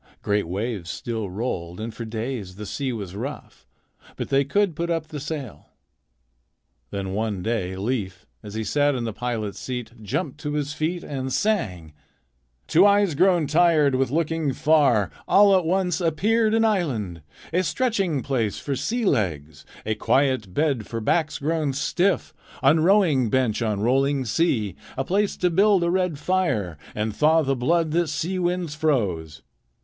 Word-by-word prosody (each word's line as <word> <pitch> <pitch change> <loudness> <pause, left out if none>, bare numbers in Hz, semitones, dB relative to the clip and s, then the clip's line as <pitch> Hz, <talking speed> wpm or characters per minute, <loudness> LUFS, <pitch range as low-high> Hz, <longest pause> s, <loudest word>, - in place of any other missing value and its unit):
Great 105 -3 0
waves 100 -1 -3
still 110 -2 -4
rolled, 90 -4 -4
and 110 +1 -5
for 115 - -6
days 110 -4 -5
the 105 +2 -7
sea 135 +5 -3
was 100 -6 -6
rough, 135 +8 -7 0.5
but - - -5
they 135 0 +3
could 185 +4 +1
put 170 +2 -2
up 165 -2 -2
the 150 - -5
sail. 140 - -6 1.2
Then 95 -1 -4
one 105 -3 -2
day 105 -5 -1
Leif, 95 -3 -3 0.2
as 105 0 -9
he 110 - -2
sat 145 +4 +2
in 125 - -2
the 115 -2 -3
pilot's 110 -4 -3
seat, 125 -1 -5
jumped 130 +7 -3
to 150 -1 -4
his 150 -1 -2
feet 165 +3 -2
and 130 -2 -4
sang: 95 - -1 0.8
"To 175 - +6
eyes 200 -3 +4
grown 175 +1 +3
tired 155 -2 +4
with 130 0 +1
looking 160 -1 0
far, 140 - +3 0.2
All 200 -1 +6
at 185 -3 +2
once 185 +1 0
appeared 215 +7 +2
an 225 0 +3
island, 125 - -1 0.3
A 180 - +3
stretching 185 - 0
place 115 -7 -1
for 140 - -3
sea 235 - -1
legs, 80 - -1 0.2
A 110 - 0
quiet 130 -2 +1
bed 135 - 0
for 115 - -4
backs 155 +7 0
grown 150 -1 -1
stiff 175 +6 0 0.3
On 145 +4 +5
rowing 160 - +3
bench 125 -2 +1
on 105 -3 -1
rolling 135 +3 +2
sea. 110 - 0 0.2
A 135 - 0
place 200 +7 0
to 180 -1 +1
build 195 +1 +4
a 170 - +1
red 180 -4 0
fire 140 - -1 0.2
And 105 0 -2
thaw 160 +4 +4
the 135 -1 0
blood 160 +6 +1
that 170 +1 +1
sea 165 +5 -2
winds 175 -3 -1
froze." 100 - -1
140 Hz, 165 wpm, -24 LUFS, 110-170 Hz, 1.2 s, To